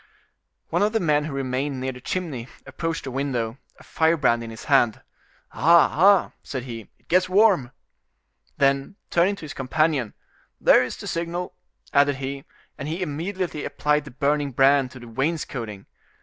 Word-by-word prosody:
One - - +1
of 210 +2 +2
the 225 - +2
men 150 -4 +2
who 155 - -5
remained 135 +1 -2
near 130 +1 -2
the 125 -1 -11
chimney 145 -8 -4 0.2
approached 165 -1 -4
the 135 - -5
window, 125 -3 -2 0.2
a - - -16
firebrand 150 -8 +2
in 115 - -7
his 110 -1 -9
hand. 135 -6 +3 0.5
"Ah, 170 +1 +5
ah!" 195 +4 +5
said 130 -3 -5
he, 115 -4 -8
"it - - -36
gets 185 +1 +3
warm." 190 - +4 0.9
Then, 140 +6 +1 0.2
turning 180 +4 +3
to - - -13
his 145 - -7
companion: 135 -2 0 0.4
"There - - +6
is - - -5
the - - -9
signal," 170 +1 -3 0.4
added 145 0 +4
he; 135 +1 -5 0.3
and 140 - -4
he 165 +4 -2
immediately 170 +1 -3
applied 150 +1 0
the - - -8
burning 140 +1 0
brand 135 +1 +4
to 130 - -12
the 120 - -11
wainscoting. 115 -5 -3
145 Hz, 165 wpm, -24 LUFS, 130-165 Hz, 0.9 s, There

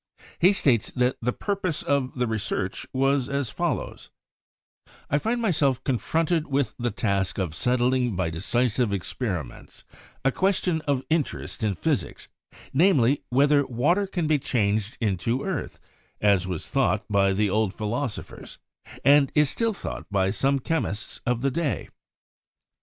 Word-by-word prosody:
He 180 +3 +6
states 125 - +2
that 125 0 +2
the 125 +1 +1
purpose 190 - -2
of 140 -2 0
the 125 - +1
research 105 -4 -3
was 135 0 +1
as 140 -3 -1
follows: - - -3 1.0
"I 145 - +3
find 230 +8 -1
myself 155 - +1
confronted 160 +5 0
with 140 -5 0
the 120 0 0
task 100 -3 -1
of 90 -6 -2
settling 125 +3 +1
by 90 -3 -1
decisive 120 +6 0
experiments 95 - -4 0.4
a 135 - +4
question 185 -1 +1
of 135 -2 +1
interest 160 -6 -1
in 105 -3 +1
physics, - - -2 0.5
namely, 145 -5 +4
whether 145 +3 +4
water 160 - +1
can 180 -4 -2
be 155 -1 +2
changed 110 -4 0
into 115 +5 0
earth, 185 -8 -3 0.4
as 100 -3 +3
was 90 -4 -5
thought - - +1
by 100 -1 +3
the 100 +1 +1
old 110 -1 +1
philosophers, 115 +4 -5 0.5
and 140 0 +6
still 230 - 0
is 210 - -5
thought - - -6
by 95 -1 +1
some 135 +6 +1
chemists 130 -7 -3
of 125 0 0
the 135 - +2
day." 160 0 -2
125 Hz, 140 wpm, -25 LUFS, 105-145 Hz, 1.0 s, He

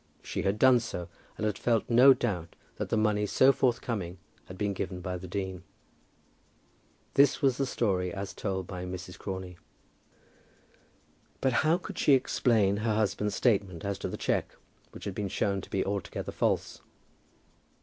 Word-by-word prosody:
She - - -3
had 100 +2 0
done 130 +1 +6
so, 90 -7 -5 0.3
and 110 - -2
had 105 -2 -1
felt 115 -3 +1
no 125 +3 +7
doubt 95 -10 -1 0.2
that - - -3
the - - +1
money 105 -1 +2
so 130 +6 +5
forthcoming 115 -9 -1 0.3
had 90 - -10
been 100 0 -1
given 95 -1 -4
by 90 +1 -4
the 90 +1 -7
dean. 95 -1 -4 1.5
That 140 -1 +5
was 135 -2 +3
the 135 - 0
story 95 -7 0
as 100 +1 -5
told 95 -3 -3
by 90 0 -6
Mrs. 90 0 -7
Crawley. 95 -3 -6 1.8
But 130 -2 +1
how 160 +3 +3
could 195 +1 -8
she 145 - +5
explain 110 -6 +3
her 110 0 0
husband's 105 -1 0
statement 100 -8 +1
as 100 -1 -2
to - - -3
the - - -5
cheque, - - -1 0.3
which - - -11
had 100 - -3
been 100 0 -3
shown 100 +1 0
to - - -12
be 95 - -1
altogether 100 -1 -3
false? - - -1
100 Hz, 165 wpm, -29 LUFS, 95-120 Hz, 1.8 s, no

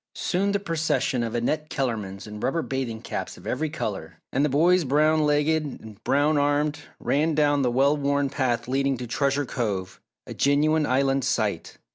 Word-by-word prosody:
Soon 195 +3 0
the 200 - +1
procession 150 -8 0
of 115 0 -3
"Annette 150 +6 -1
Kellermans" 110 -8 -3
in 105 0 -8
rubber 160 +8 -1
bathing 125 -4 -4
caps - - -5
of - - -15
every 155 0 -1
colour, 110 - -5 0.2
and 135 - +2
the 150 - +2
boys 170 +6 +4
brown 155 +2 +3
legged 150 +2 +2
and 110 -7 -9
brown 145 +2 +2
armed, 145 +1 +1 0.2
ran 155 +2 +1
down 145 -1 +3
the 125 - +2
well 135 +4 +3
worn 140 -1 +1
path 130 -4 -1
leading 135 +1 0
to 125 - -5
Treasure 140 +4 0
Cove, 100 -7 -3 0.2
a - - -7
genuine 150 +2 +2
Island 135 +1 +2
sight. - - -1
140 Hz, 175 wpm, -25 LUFS, 125-150 Hz, 0.2 s, boys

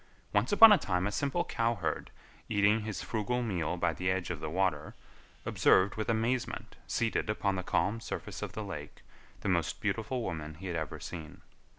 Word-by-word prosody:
Once 105 +3 +2
upon 220 +2 +10
a 205 - +7
time 90 -7 0
a 105 - 0
simple 140 +11 0
cowherd, 115 - -1 0.4
eating 105 +1 +4
his 110 -1 -4
frugal 120 +3 -1
meal 90 -6 -1
by 85 -1 +1
the 90 +3 -1
edge 95 -2 -1
of 85 - -4
the - - -4
water, 80 -3 0 0.5
observed 95 +2 +4
with 110 +2 -3
amazement, 115 +3 -1
seated 115 -2 0
upon 100 -2 0
the 95 - -2
calm 95 +4 0
surface - - -6
of - - -5
the - - -4
lake, - - -8 0.4
the - - -3
most - - 0
beautiful 115 +2 -1
woman 80 -5 -4
he 90 +5 -10
had 90 -2 -3
ever 80 -3 -3
seen. 80 -4 -8
100 Hz, 185 wpm, -31 LUFS, 90-115 Hz, 0.5 s, upon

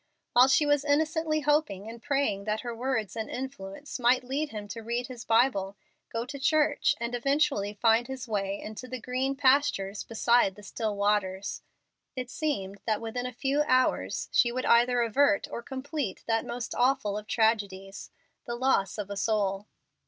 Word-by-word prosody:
While 250 +2 +7
she 285 +3 +4
was 290 -1 +2
innocently 310 +1 +1
hoping 295 -10 +1
and 230 +1 -9
praying 270 -9 0
that 215 0 -1
her 240 -1 -5
words 225 -5 -2
and 220 -1 -4
influence 255 0 -6
might 250 +1 +3
lead 280 +4 -2
him 210 -4 -7
to 230 - -6
read 235 +2 -2
his 245 -2 -8
Bible, 215 -5 +2 0.3
go 230 +1 -2
to 280 +2 -7
church, 295 +1 +2
and 235 +1 -3
eventually 275 -5 +1
find 230 +2 +3
his 265 -1 -6
way 200 -2 -2
into 220 +4 -8
the 255 0 -5
"green 255 +3 -1
pastures 260 -8 +2
beside 230 -3 +2
the 210 - -13
still 215 +1 -3
waters," 200 -1 0 0.5
it 255 -1 -5
seemed 200 - -2
that 215 -2 +1
within 240 +2 -4
a - - -5
few 270 +4 0
hours 255 0 +1
she 240 - +4
would 255 +1 -3
either 240 +1 +4
avert 230 -2 +2
or - - -4
complete 265 - -4
that 225 0 0
most 240 0 -4
awful 245 -5 +1
of 210 0 -6
tragedies 200 -4 0 0.4
the 235 - -3
loss 240 -7 +1
of 205 -1 -5
a - - -3
soul. 200 -1 0
235 Hz, 175 wpm, -28 LUFS, 210-270 Hz, 0.5 s, While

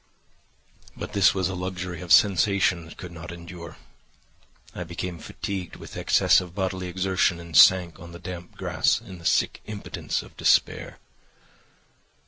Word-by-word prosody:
"But - - -7
this 100 -1 +4
was 95 -2 +1
a 95 - -4
luxury 90 -1 -5
of 90 -2 -7
sensation 100 -3 +4
that 80 - -13
could 90 -2 -8
not 85 0 -9
endure; 85 0 -10 1.0
I 90 - -5
became 85 0 -6
fatigued 95 0 -5
with - - -11
excess - - +4
of 90 -1 -10
bodily 95 -1 -2
exertion 95 -1 0
and 85 -1 -9
sank 90 -2 +6
on 85 -2 -11
the 85 - -9
damp 90 0 -9
grass - - +1
in 90 - -11
the 85 - -14
sick - - +1
impotence 105 -1 -4
of - - -16
despair. - - +2
90 Hz, 150 wpm, -25 LUFS, 85-95 Hz, 1.0 s, sank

